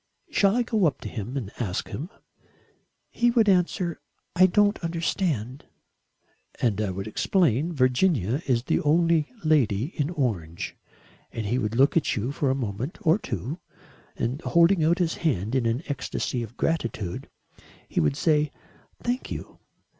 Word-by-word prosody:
Shall 200 +1 +3
I 245 - +2
go 220 -5 +1
up 145 - -2
to - - -6
him 120 +4 -5
and 110 -7 -4
ask 100 -7 -2
him?" 155 +7 -5 1.0
"He 240 0 +2
would 235 -3 +3
answer: 180 -2 +1 0.4
'I 185 +1 +7
don't 205 +1 +2
understand.'" 165 - -2 0.9
"And 110 -4 +1
I 105 - 0
would 95 +1 -4
explain: 155 - +1
'Virginia 130 - +2
is 120 -3 +2
the - - +1
only 165 0 +3
lady 140 - +2
in 145 -1 0
orange,' 105 - -2 0.6
and 115 - -4
he 120 +5 0
would 110 -2 -2
look 135 +4 +4
at 165 - +2
you 115 +5 -2
for 140 -1 0
a 130 - +2
moment 120 - -4
or 165 +3 +3
two 125 - -4 0.6
and, 125 +7 -2
holding 170 0 +4
out 165 +3 +3
his 175 -3 0
hand 115 - -1
in 130 -3 +2
an 115 +7 -1
ecstasy 130 -3 -3
of 115 +1 -8
gratitude, 115 - -2 0.6
he - - -1
would 75 -3 +2
say: 150 -2 +2 0.5
'Thank 245 +2 -2
you. - - -7
140 Hz, 155 wpm, -26 LUFS, 115-170 Hz, 1.0 s, I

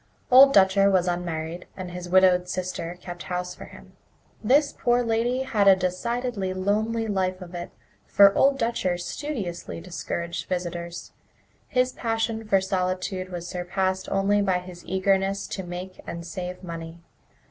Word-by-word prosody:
Old 270 +2 +9
Dutcher 195 -2 +5
was 185 -2 +2
unmarried, 175 -1 -3
and 185 -2 -6
his 180 0 -7
widowed 180 -1 +4
sister 180 -2 -4
kept 175 -1 -8
house 180 0 -4
for - - -10
him. - - -15 0.5
This 280 +6 +3
poor 245 0 +2
lady 235 +3 0
had 215 -6 +1
a 195 - +9
decidedly 190 +2 -2
lonely 215 +4 0
life 190 -3 -1
of 180 -1 -10
it, 175 0 -5 0.4
for 200 -1 +6
Old 275 +4 +4
Dutcher 230 -7 0
studiously 190 - -5
discouraged 170 -1 -5
visitors. 175 -1 -4 0.6
His 255 -1 +1
passion 225 -2 -2
for 195 -2 +4
solitude 185 0 -2
was 175 -1 -6
surpassed 185 +1 -2
only 200 +1 +2
by 190 -2 +2
his 180 -1 -9
eagerness 195 +1 +1
to 190 - -4
make 180 +1 -7
and 170 0 -6
save 180 +2 -6
money. 165 -1 -7
185 Hz, 145 wpm, -25 LUFS, 180-205 Hz, 0.6 s, Old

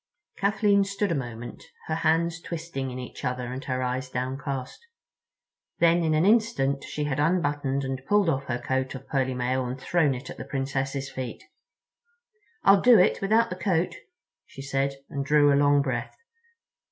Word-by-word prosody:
Kathleen 200 0 +3
stood 200 0 -1
a - - +2
moment, 120 -4 -6 0.2
her 160 - -2
hands 165 +1 +1
twisting 165 -6 -5
in 125 - -6
each 125 -1 -8
other 125 0 -3
and 130 +2 -6
her 130 -1 -1
eyes 130 +1 -2
downcast. 130 - -4 1.0
Then 170 0 +4
in 155 -1 +2
an 155 +3 +3
instant 205 - +2
she 150 - -4
had 145 -1 -1
unbuttoned 145 -4 +1
and 135 -1 -4
pulled 205 0 +3
off 140 -4 0
her 120 -2 -2
coat 130 +2 -2
of 135 0 -9
pearly 130 -2 0
mail 125 +1 0
and 125 +1 -5
thrown 150 -1 +1
it 125 - -8
at - - -10
the - - -6
Princess's 135 0 -3
feet. 130 -2 -6 1.2
"I'll 195 0 +6
do 245 -2 +7
it 180 - +3
without 220 +4 +2
the - - -2
coat," 180 -1 0 0.5
she 135 - -10
said, 135 0 -1
and 140 -1 -3
drew 145 0 +4
a - - +4
long 145 0 +4
breath. 125 -4 -3
140 Hz, 175 wpm, -26 LUFS, 130-170 Hz, 1.2 s, do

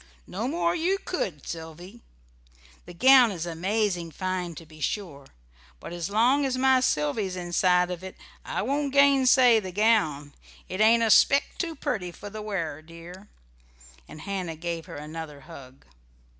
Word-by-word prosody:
"No 220 +6 -4
more 340 +4 0
you 355 +3 0
could, 195 - -5
Sylvy. 170 +7 -9 0.9
The 175 - -10
gown 255 +4 +6
is 175 -5 -5
amazing 180 +1 -1
fine, 180 +1 -4
to 165 - -10
be 155 0 -16
sure; 145 -8 -4 0.5
but - - -9
as 175 0 -4
long 245 +7 +3
as 260 -2 -1
my 260 0 +4
Sylvy's 185 - -1
inside 180 0 +1
of 180 0 -6
it 190 - -8 0.3
I - - -3
won't 280 +3 -1
gainsay 260 -4 +5
the 190 -3 -7
gown. 180 -9 +1 0.3
It 185 +3 -4
ain't 230 +2 +5
a 225 - +2
speck 280 +6 +5 0.2
too 330 -3 -3
pretty 195 - -3
for 205 +4 -10
the 215 +1 -7
wearer, 170 -8 -4
dear." 170 +5 -13 0.8
And 155 - -11
Hannah 185 -3 -4
gave 165 0 -5
her - - -9
another 150 -1 -8
hug. 135 0 -14
185 Hz, 155 wpm, -26 LUFS, 165-240 Hz, 0.9 s, gown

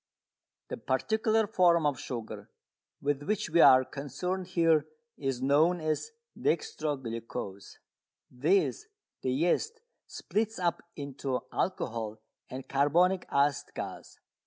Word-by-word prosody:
The - - -4
particular 220 0 +1
form 170 -4 +3
of 145 -4 +1
sugar 115 -3 -6 0.5
with 145 0 0
which 210 +2 -2
we 170 +1 +5
are 130 -2 +8
concerned 175 +8 -4
here 165 -4 +3 0.3
is 135 -3 -3
known 155 +6 +4
as 155 - -1 0.3
"dextro 445 - -1
glucose." 115 -5 -6 0.5
This 180 - +1 0.3
the 130 - 0
yeast 175 - 0 0.3
splits 220 +1 -2
up 175 -2 0
into 140 -2 -3
alcohol 115 - -2 0.3
and 130 +1 -7
carbonic 175 +7 +2
acid 140 0 +1
gas. - - -7
150 Hz, 110 wpm, -30 LUFS, 135-185 Hz, 0.5 s, are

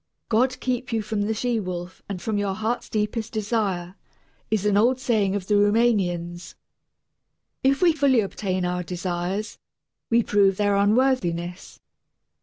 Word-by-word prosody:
"God 255 +3 +2
keep 250 -1 -2
you 225 -1 0
from 210 0 -2
the 210 +2 0
she 240 +1 0
wolf 180 -2 -6
and 195 -2 -4
from 210 +3 -2
your 200 -1 -1
heart's 220 +3 -2
deepest 215 +1 -2
desire," 205 -5 -1 0.6
is 215 -2 0
an 205 -1 +3
old 245 +5 +3
saying 215 -6 +1
of 200 -3 -3
the 210 - 0
Rumanians. 195 -5 +1 1.1
If 275 +5 +3
we 340 -2 +6
fully 275 -6 +3
obtain 190 -2 -2
our 180 0 -1
desires, 180 +3 -3 0.5
we 235 0 +4
prove 195 -2 +3
their 205 -1 +2
unworthiness. 200 -5 0
205 Hz, 145 wpm, -24 LUFS, 185-230 Hz, 1.1 s, we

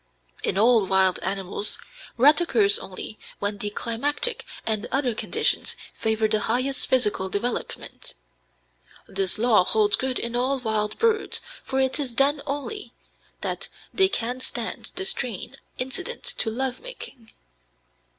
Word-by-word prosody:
In - - 0
all 225 -1 +5
wild 190 -1 +5
animals, 195 +2 +1 0.4
rut 290 +6 +6
occurs 215 -11 +4
only 195 +3 -7 0.2
when 205 0 -2
the 205 - -1
climatic 290 - -1 0.2
and 220 0 -1
other 265 -3 +1
conditions - - 0 0.2
favor 220 0 +1
the 215 0 +3
highest 255 +5 0
physical 210 -7 +2
development. 225 +6 -3 0.9
This 190 -1 0
law 220 -4 +5
holds 210 +2 +3
good 260 -1 -1
in 235 0 -3
all 260 +3 +1
wild 215 -3 -1
birds, 450 -2 +2 0.2
for 265 - -1
it 265 +2 +1
is 255 -5 -3
then 280 +3 +3
only 290 +10 -4 0.5
that - - -3 0.2
they 385 -1 +5
can 245 - -1
stand - - -4
the 385 - -2
strain 250 - -3 0.2
incident 365 - -4
to 480 - 0
love 255 +3 -2
making. 275 - -9
240 Hz, 135 wpm, -25 LUFS, 210-275 Hz, 0.9 s, rut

